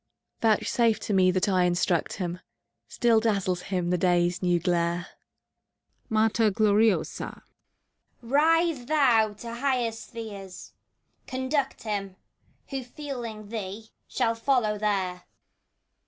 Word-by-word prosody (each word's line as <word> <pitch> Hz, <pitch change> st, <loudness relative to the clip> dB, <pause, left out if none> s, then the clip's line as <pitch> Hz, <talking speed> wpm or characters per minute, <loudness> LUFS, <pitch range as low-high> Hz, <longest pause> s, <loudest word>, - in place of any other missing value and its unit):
Vouchsafe 225 Hz, 0 st, +2 dB
to 210 Hz, -, -2 dB
me 185 Hz, -1 st, +5 dB
that 185 Hz, +1 st, +1 dB
I 185 Hz, -2 st, +3 dB
instruct 175 Hz, -1 st, +1 dB
him! 180 Hz, -1 st, -4 dB, 0.5 s
Still 235 Hz, -2 st, +3 dB
dazzles 195 Hz, -5 st, 0 dB
him 180 Hz, -2 st, -2 dB
the 180 Hz, -, +1 dB
Day's 175 Hz, 0 st, +2 dB
new 175 Hz, -2 st, +2 dB
glare. 170 Hz, 0 st, 0 dB, 1.0 s
MATER 220 Hz, 0 st, +3 dB
OLORIOSA. 210 Hz, +1 st, +1 dB, 0.8 s
Rise, 305 Hz, +1 st, +2 dB
thou, 245 Hz, -8 st, +3 dB
to 230 Hz, +3 st, -8 dB
higher 250 Hz, -2 st, 0 dB
spheres! 220 Hz, -4 st, -9 dB, 0.5 s
Conduct 260 Hz, +2 st, -2 dB
him. 200 Hz, -3 st, -3 dB, 0.6 s
Who, 270 Hz, -1 st, -3 dB
feeling 240 Hz, -6 st, -7 dB
thee, 215 Hz, 0 st, -6 dB, 0.2 s
shall 230 Hz, -, 0 dB
follow 230 Hz, -3 st, +1 dB
there! 190 Hz, -4 st, -1 dB
215 Hz, 110 wpm, -27 LUFS, 185-235 Hz, 1.0 s, me